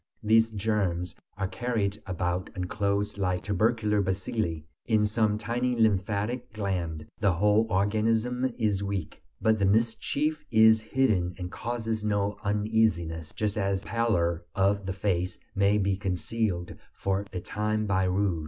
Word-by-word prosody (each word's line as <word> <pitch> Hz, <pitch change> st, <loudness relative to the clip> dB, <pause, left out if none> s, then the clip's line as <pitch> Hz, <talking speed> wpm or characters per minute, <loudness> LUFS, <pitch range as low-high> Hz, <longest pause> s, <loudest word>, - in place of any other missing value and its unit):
These 115 Hz, +1 st, +4 dB
germs 100 Hz, -5 st, -1 dB, 0.2 s
are 95 Hz, -2 st, -1 dB
carried 105 Hz, -2 st, -2 dB
about 90 Hz, 0 st, -2 dB
enclosed 100 Hz, +2 st, -1 dB
like 90 Hz, -2 st, 0 dB
tubercular 105 Hz, +1 st, +1 dB
bacilli 95 Hz, -3 st, -2 dB, 0.2 s
in 110 Hz, -3 st, +3 dB
some 105 Hz, 0 st, +1 dB
tiny 120 Hz, +3 st, -1 dB
lymphatic 105 Hz, +3 st, +1 dB
gland; 90 Hz, -7 st, -3 dB
the 100 Hz, -3 st, +3 dB
whole 105 Hz, +5 st, +3 dB
organism 110 Hz, +6 st, +1 dB
is 105 Hz, -4 st, +1 dB
weak. 100 Hz, -4 st, -4 dB, 0.2 s
But 110 Hz, -1 st, +2 dB
the 100 Hz, -, +3 dB
mischief 115 Hz, +8 st, +1 dB
is 110 Hz, -1 st, +6 dB
hidden 110 Hz, -7 st, +1 dB
and 90 Hz, -1 st, -5 dB
causes 115 Hz, -2 st, -3 dB
no 105 Hz, -1 st, 0 dB
uneasiness, 105 Hz, -6 st, 0 dB
just 105 Hz, -1 st, -2 dB
as 100 Hz, -1 st, 0 dB
the -, -, -11 dB
pallor 90 Hz, -8 st, +1 dB
of 100 Hz, 0 st, +1 dB
the 95 Hz, -, -1 dB
face 95 Hz, -2 st, -1 dB, 0.2 s
may 100 Hz, +1 st, +3 dB
be 100 Hz, -1 st, +1 dB
concealed 95 Hz, -1 st, -2 dB, 0.2 s
for 100 Hz, +1 st, -1 dB
a 90 Hz, -, -3 dB
time 110 Hz, +3 st, -1 dB
by 95 Hz, -2 st, +1 dB
rouge. 90 Hz, -2 st, +1 dB
105 Hz, 140 wpm, -28 LUFS, 95-110 Hz, 0.2 s, is